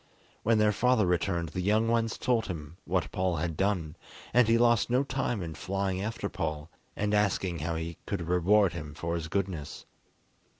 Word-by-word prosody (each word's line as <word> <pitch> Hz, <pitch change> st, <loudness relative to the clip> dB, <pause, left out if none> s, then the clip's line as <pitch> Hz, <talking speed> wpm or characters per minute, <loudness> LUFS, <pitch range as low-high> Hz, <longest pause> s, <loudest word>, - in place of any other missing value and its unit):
When 115 Hz, 0 st, +3 dB
their 105 Hz, 0 st, +4 dB
father 120 Hz, 0 st, +3 dB
returned 85 Hz, -1 st, 0 dB
the 90 Hz, -, -3 dB
young 105 Hz, +4 st, +2 dB
ones 115 Hz, -1 st, +1 dB
told 120 Hz, -4 st, +1 dB
him 80 Hz, -2 st, -7 dB
what 85 Hz, -3 st, -1 dB
Paul 90 Hz, -1 st, 0 dB
had 85 Hz, 0 st, -2 dB
done, 90 Hz, -4 st, 0 dB, 0.4 s
and 125 Hz, -2 st, +5 dB
he 115 Hz, 0 st, +4 dB
lost 120 Hz, -1 st, +3 dB
no 125 Hz, +3 st, +3 dB
time 130 Hz, -7 st, -2 dB
in 80 Hz, -1 st, -5 dB
flying 95 Hz, +1 st, -2 dB
after 110 Hz, +3 st, -3 dB
Paul, 75 Hz, 0 st, -4 dB, 0.2 s
and 105 Hz, 0 st, -1 dB
asking 95 Hz, -4 st, +1 dB
how 85 Hz, +2 st, -2 dB
he 80 Hz, +1 st, -4 dB
could 90 Hz, -5 st, -3 dB
reward 90 Hz, +2 st, +3 dB
him 75 Hz, -3 st, -7 dB
for 85 Hz, +1 st, -3 dB
his 85 Hz, -2 st, -3 dB
goodness. 90 Hz, -5 st, -3 dB
95 Hz, 180 wpm, -29 LUFS, 85-110 Hz, 0.4 s, and